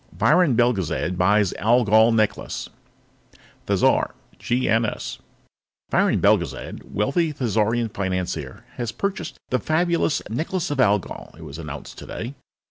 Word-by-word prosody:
VIRON 155 -5 +4
BELGEZAD 100 -7 +1
BUYS 100 +2 +3
ALGOL 110 0 +5
NECKLACE 110 -2 -1 1.0
Thizar - - +2 0.3
(GNS) 115 -2 0 0.7
Viron - - +3
Belgezad, - - +1
wealthy 145 - +1
Thizarian 115 -3 0
financier, 95 -2 -3
has 120 -2 -2
purchased 200 +6 -3
the 125 - +2
fabulous 170 -1 +1
Necklace 165 - -2
of 145 - -2
Algol, 105 -6 0
it 85 - -11
was 75 +1 -8
announced 75 -3 -8
today. 120 +4 -6
115 Hz, 110 wpm, -23 LUFS, 100-140 Hz, 1.0 s, ALGOL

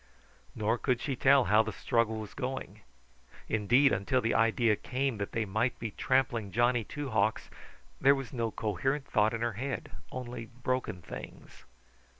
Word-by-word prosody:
Nor 115 +2 0
could 125 -3 +1
she 135 +1 -2
tell 135 +2 +5
how 105 +1 +5
the 110 0 -3
struggle 115 +2 0
was 105 -2 -7
going. 135 0 -5 0.7
Indeed 120 +6 +4
until 115 +6 +1
the 115 -1 0
idea 115 -1 +3
came 130 0 -2
that 100 - -3
they 115 -1 -1
might 110 +5 0
be 115 -2 -4
trampling 120 -4 0
Johnny 120 +2 +2
Two 145 +3 -6
Hawks 110 0 0 0.5
there 140 +1 +6
was 135 -2 -6
no 115 -2 -1
coherent 135 +8 -1
thought 110 -2 +2
in 115 - -5
her 120 -1 0
head, 130 +2 -4 0.2
only 120 -2 -6
broken 125 -7 -3
things. - - -10
115 Hz, 160 wpm, -30 LUFS, 110-130 Hz, 0.7 s, there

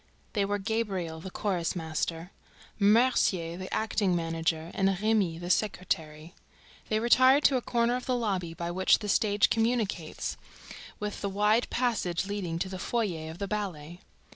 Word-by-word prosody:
They 205 -3 +1
were 205 +1 -1
Gabriel, 195 -6 -2
the 190 - -7
chorus 185 -3 -2
master; 165 +1 -3 0.5
Mercier, 200 -6 +3
the 185 +1 -7
acting 210 -4 +1
manager; 165 0 -1
and 195 -2 +1
Remy, 210 -6 +1
the 175 +1 -3
secretary. 165 -5 -2 0.6
They 215 - +2
retired 255 +5 +5
to 270 - +5
a - - -2
corner 235 0 +1
of 250 - -5
the 255 - +1
lobby 190 -8 -2
by 170 0 -4
which 185 +2 +4
the 210 - -6
stage 205 0 +3
communicates 225 -8 -1 0.6
with 210 -1 -4
the 200 - -1
wide 210 +4 +2
passage 210 -8 0
leading 195 -5 -3
to 180 - -2
the 185 -1 -6
foyer 180 -9 -2
of 160 - -8
the 200 - -3
ballet. 175 -6 -4
195 Hz, 160 wpm, -29 LUFS, 170-220 Hz, 0.6 s, retired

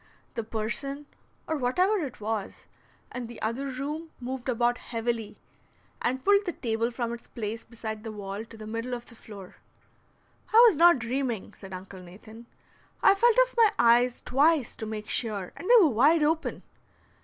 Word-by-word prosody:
The 230 - -3
person, 235 +7 -4 0.4
or 315 - -1
whatever 360 +11 +2
it 285 -7 -5
was, 215 -1 -4 0.5
in 250 -2 -5
the 235 -1 -10
other 235 +6 -2
room 290 +5 -5
moved 255 +1 -5
about 240 0 +1
heavily, 230 -2 -3 0.6
and 260 +1 -1
pulled 405 0 +4
the 350 - -1
table 230 -1 -1
from 235 -1 -3
its 235 - -10
place 225 0 -5
beside 220 -2 -7
the 225 - -5
wall 200 0 -6
to 225 0 -13
the 215 - -9
middle 230 +3 -4
of 240 0 -9
the - - -13
floor. 200 -5 -12 0.9
"I 440 - +4
was 425 - +4
not 340 +1 +6
dreaming," 240 -2 -3
said 195 -1 -12
Uncle 185 0 -9
Nathan; 215 +6 -13 0.6
"I - - +7
felt 465 +4 +3
of - - -18
my 450 -2 +5
eyes 240 +1 +4
twice 285 0 +2
to 220 - -5
make 215 -1 -6
sure, 205 -6 -1
and 365 - -7
they - - +8
were 345 -7 +5
wide 290 +7 +4
open." 320 +2 -1
240 Hz, 175 wpm, -27 LUFS, 220-285 Hz, 0.9 s, they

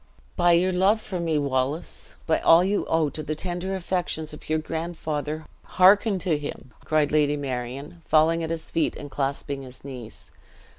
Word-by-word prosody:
"By 175 -1 +4
your 180 +2 +3
love 190 +4 +3
for 190 -4 -5
me, 165 -2 0
Wallace 140 +2 -2
by 160 - +2
all 165 +2 +6
you 200 +2 0
owe 160 -3 +2
to 155 - -5
the 155 +1 -3
tender 180 +3 -3
affections 175 -4 -2
of 150 - -11
your 155 - +2
grandfather, 155 -1 -4 0.2
hearken 195 +2 +5
to 160 -5 +2
him!" 135 -4 -7
cried 155 -2 +1
Lady 150 -1 +3
Marion, 135 +4 -5
falling 160 +2 +4
at 160 - -3
his 165 -1 -4
feet, 165 -2 +1
and 145 -1 -8
clasping 140 0 -2
his 130 -1 -12
knees. 125 -5 -9
155 Hz, 170 wpm, -25 LUFS, 145-175 Hz, 0.2 s, all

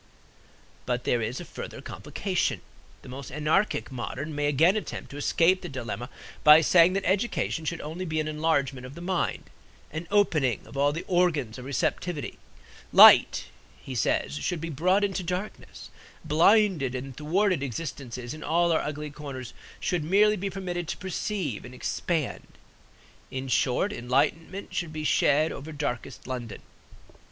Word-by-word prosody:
But 125 0 -1
there 120 - +1
is 115 +3 -3
a - - -7
further - - -8
complication. - - -2 0.4
The - - -11
more 135 +2 -7
anarchic 150 +2 0
modern 130 +4 -5
may 145 0 0
again 160 +7 +4
attempt 215 - -5
to 140 - -8
escape 170 +5 +3
the 175 - -6
dilemma 120 -2 -5 0.3
by 150 +1 +9
saying 170 +2 +5
that 195 0 -1
education 190 -4 0
should 165 +1 -3
only 165 +5 -5
be 155 -2 -1
an 155 - -1
enlargement 145 -5 0
of 135 - -12
the - - -9
mind, 180 0 -2 0.4
an 160 +2 -5
opening 155 - +2
of - - -13
all 140 +1 +3
the 165 +4 -5
organs 155 -10 +1
of 125 - -9
receptivity. 145 +3 -2 0.5
Light - - +8 0.3
(he 135 - -8
says) 90 - 0
should 170 - -2
be 165 +1 -5
brought 185 +8 +2
into 195 -1 0
darkness; 180 +4 -6 0.3
blinded 165 - +3
and 130 0 -6
thwarted 175 +3 +1
existences 125 -2 -5
in 155 - -9
all 170 +1 +2
our 160 - +2
ugly 150 0 -5
corners 135 -5 -8 0.3
should 175 -4 -1
merely 205 +6 +4
be 200 0 -3
permitted 180 -3 -4
to - - -4
perceive 190 - -3
and 125 +1 -10
expand; 155 +3 -2 0.8
in 130 0 -5
short, 130 +10 +1
enlightenment 165 +9 -1
should 170 -3 -2
be 155 0 -5
shed 155 +1 +3
over 150 +3 -7
darkest 135 -3 -4
London. 120 -5 -6
155 Hz, 155 wpm, -27 LUFS, 135-180 Hz, 0.8 s, by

